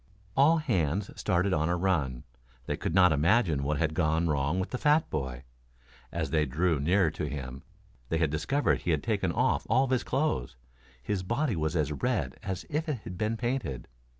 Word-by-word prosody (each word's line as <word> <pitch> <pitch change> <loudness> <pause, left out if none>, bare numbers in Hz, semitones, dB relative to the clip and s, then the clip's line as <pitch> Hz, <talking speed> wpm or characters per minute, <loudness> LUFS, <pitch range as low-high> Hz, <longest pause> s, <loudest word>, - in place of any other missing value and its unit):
All 150 +5 +5
hands 100 - 0
started 95 +2 +1
on 80 0 +1
a 90 - +1
run. 75 -10 0 0.4
They - - -2
could 80 - -3
not 90 -3 +6
imagine 80 - +3
what 75 +2 0
had 80 0 0
gone 80 0 +1
wrong 75 +3 0
with 95 - -3
the 125 - -3
fat 150 +1 +3
boy. 65 -4 -3 0.7
As - - -3
they 75 -2 +2
drew 80 +3 +1
nearer 85 +3 +2
to 75 - -4
him 65 -2 -6 0.5
they 80 - +1
discovered 85 - 0
that - - -18
he - - 0
had 80 -3 +1
taken 100 -6 0
off - - +1
all 130 - +4
his 130 -2 0
clothes. 135 - -1 0.5
His 95 +7 -1
body 120 +6 -1
was 80 +1 -1
as 75 -3 +1
red 70 - -2
as 95 -2 -4
if 155 +2 -2
it 130 -8 -2
had 90 - -7
been 110 +4 -1
painted. 120 - -3
85 Hz, 190 wpm, -29 LUFS, 75-110 Hz, 0.7 s, not